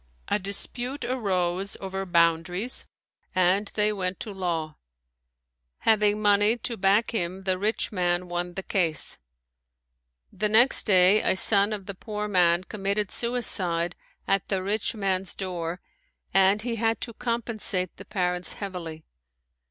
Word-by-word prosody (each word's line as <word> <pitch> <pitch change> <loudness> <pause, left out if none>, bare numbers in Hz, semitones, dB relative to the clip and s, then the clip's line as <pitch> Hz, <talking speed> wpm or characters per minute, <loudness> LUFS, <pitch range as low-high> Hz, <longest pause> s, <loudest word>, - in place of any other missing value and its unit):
A 205 - +1
dispute 240 +7 -2
arose 195 -6 -1
over 190 0 -5
boundaries 170 +6 +1 0.5
and 185 +3 +2
they 210 0 +2
went 185 -2 -3
to 215 - -6
law. 170 -5 -3 1.0
Having 210 -1 +3
money 205 +2 +4
to 235 0 -4
back 200 +3 +2
him 190 -3 -2
the 185 -1 0
rich 215 +4 -1
man 180 -2 0
won 175 0 -4
the 195 - -4
case. 170 -7 0 1.1
The 210 +2 -1
next 235 +5 +5
day 190 +1 +6
a - - +1
son 200 +2 +5
of 205 -3 -5
the 200 - -5
poor 210 +2 -5
man 180 -3 +3
committed 200 0 -2
suicide 185 -8 0 0.3
at 195 -1 +1
the 190 -2 -1
rich 210 +3 -1
man's 190 -3 -2
door 180 -2 -4 0.5
and 195 +2 +4
he 235 -1 -3
had 225 0 0
to 235 - -4
compensate 225 -6 -2
the - - -11
parents 180 -2 -1
heavily. 170 -5 -7
195 Hz, 135 wpm, -26 LUFS, 180-210 Hz, 1.1 s, day